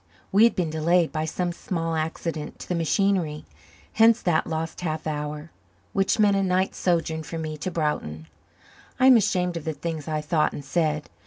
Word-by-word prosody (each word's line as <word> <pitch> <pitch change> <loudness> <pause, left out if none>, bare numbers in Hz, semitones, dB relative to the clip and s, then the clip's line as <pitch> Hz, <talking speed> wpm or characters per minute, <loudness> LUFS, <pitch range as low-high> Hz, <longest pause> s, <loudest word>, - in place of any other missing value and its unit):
We 205 +4 +6
had 235 - +3
been 170 -4 -1
delayed 165 +2 +2
by 155 0 -2
some 175 +2 -2
small 165 -1 -3
accident 160 0 -3
to - - -10
the - - -1
machinery; 170 -2 0 0.5
hence 225 +1 +5
that 170 -3 +1
lost 160 +1 -4
half 160 -3 -3
hour, 150 +1 -4 0.4
which 195 0 +2
meant 205 -2 +4
a 195 - +2
night's 185 0 0
sojourn 165 -3 0
for 165 +1 -6
me 155 -1 -5
in 185 - -2
Broughton. 150 - -2 0.7
I 255 - +4
am 260 -1 +9
ashamed 180 -5 0
of 165 - -6
the 160 - -2
things 155 0 -5
I 155 -1 -1
thought 155 0 +1
and 145 - -7
said. 155 0 0
165 Hz, 185 wpm, -25 LUFS, 155-180 Hz, 0.7 s, am